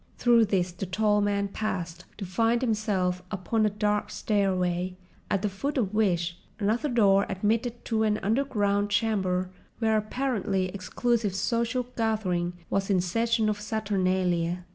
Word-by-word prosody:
Through 235 -2 +5
this 185 -3 0
the 180 +2 -6
tall 210 +2 +2
man 200 0 +1
passed 180 -5 -4
to 200 - -5
find 225 +6 +1
himself 200 -6 0
upon 215 +2 0
a - - +2
dark 210 0 0
stairway, 185 -3 0 0.3
at 200 0 0
the - - +2
foot 275 +10 -3
of 215 -5 0
which 175 -5 +1 0.2
another 225 +7 0
door 200 -5 +4
admitted 225 +5 -1
to 220 -2 0
an 215 -1 +2
underground 205 -3 +1
chamber 190 -4 0 0.3
where 220 -1 +2
an 215 - +3
apparently 210 -6 -1
exclusive 205 +2 -1
social 235 +5 0
gathering 190 -6 0
was 195 0 -1
in 190 -2 +3
session 225 +5 +1
of 210 -1 -1
Saturnalia. 185 -5 0
205 Hz, 145 wpm, -27 LUFS, 185-220 Hz, 0.3 s, Through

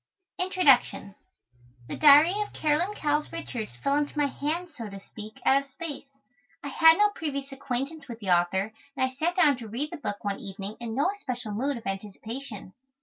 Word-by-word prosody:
INTRODUCTION 330 - +3 0.7
The - - -4
Diary 300 +4 +7
of 420 - -4
Caroline 320 +7 +1
Cowles 295 -3 0
Richards 245 -10 -5
fell 275 - +2
into 295 +1 -2
my 295 - +3
hands, 310 +4 -3
so 230 -5 -6
to 195 0 -8
speak, 215 +2 -10
out 275 +1 +5
of 275 - -16
space. 285 -1 -7 0.5
I 285 - -4
had 325 +4 +6
no 420 0 +5
previous 280 -7 -4
acquaintance 275 +3 -4
with 235 -3 -7
the 195 -4 -2
author, 190 +4 +2 0.2
and 260 - +3
I 260 - -4
sat 325 +6 -1
down 300 -7 +4
to 235 -3 -8
read 255 +8 -3
the 340 - -5
book 205 -8 -5
one 200 -1 -2
evening 195 +1 -6
in 230 -2 -5
no 290 +8 +2
especial 250 - -5
mood 260 +6 -1
of 230 - -11
anticipation. 210 +2 -6
275 Hz, 190 wpm, -27 LUFS, 220-305 Hz, 0.7 s, Diary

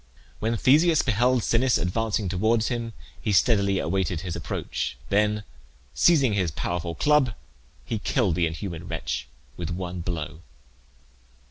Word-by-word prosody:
When 115 +1 0
Theseus 155 +7 +4
beheld 120 +1 +2
Sinnis 125 +2 +3
advancing 105 +3 -1
towards 110 +5 +1
him 120 -2 -3 0.3
he 105 - -1
steadily 100 -1 +3
awaited 90 -2 -1
his 90 -2 -4
approach; - - -4
then 105 +1 +2 0.5
seizing 140 -10 +4
his 95 -4 +1
powerful 85 +2 -3
club, 145 - +3 0.5
he 110 - -2
killed 105 -5 +1
the 85 +1 +1
inhuman 80 +1 -6
wretch 65 - -3 0.3
with 85 -1 -4
one 90 0 -4
blow. 80 -2 -4
100 Hz, 130 wpm, -25 LUFS, 85-115 Hz, 0.5 s, Theseus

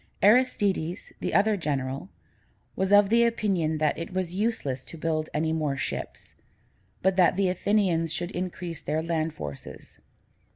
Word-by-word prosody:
Aristides, 205 -6 +2
the - - -2
other 215 +1 +4
general, 140 -2 -3 0.7
was 190 +1 0
of 205 -1 +6
the 235 +1 +5
opinion 195 -9 +1
that 155 0 0
it 165 - -5
was 185 -2 -2
useless 185 - -1
to 165 - -8
build 155 -1 -1
any 160 +1 0
more 150 -4 -1
ships, - - -5 0.7
but 190 0 +2
that 180 -1 +5
the 195 -1 +2
Athenians 180 -4 +1
should 175 +3 -2
increase 175 -2 -5
their 155 +1 -1
land 165 -1 -1
forces. 70 -2 -9
175 Hz, 150 wpm, -27 LUFS, 155-195 Hz, 0.7 s, of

